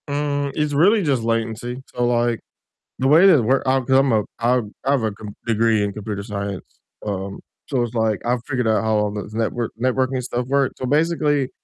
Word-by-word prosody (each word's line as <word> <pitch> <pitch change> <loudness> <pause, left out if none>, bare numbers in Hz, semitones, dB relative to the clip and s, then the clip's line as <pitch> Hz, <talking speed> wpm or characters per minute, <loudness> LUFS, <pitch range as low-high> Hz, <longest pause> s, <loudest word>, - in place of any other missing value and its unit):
Mm, 145 -1 -1
it's 150 -1 0
really 195 +8 +4
just 135 -7 +1
latency 115 +2 -2
so, 120 0 0
like, 120 -1 +1 0.6
the 130 - +2
way 160 +7 +7
that 180 -5 +7
it - - 0
work 130 +4 +2
I 135 0 +3
'cause 130 +1 +2
I'm 135 -1 +2
a 110 -2 +2 0.2
I 120 +2 +3 0.3
I 135 - +1
have 140 -5 +2
a 110 - 0
com 105 0 -10
degree 115 -2 +2
in 100 -1 -2
computer 105 -1 -5
science, 100 -2 -5 0.4
um, 100 -1 -4 0.3
so 130 -4 0
it's 120 -1 -4
like 110 -2 0
I've 120 0 0
figured 125 -4 -1
out 110 -1 +2
how 110 0 +1
all 105 -1 0
the 105 0 -6
network 115 +1 -1
networking 130 +1 0
stuff 125 0 -3
works 140 0 +1
so, 130 - -3
basically, 150 -1 +1
120 Hz, 210 wpm, -21 LUFS, 110-135 Hz, 0.6 s, way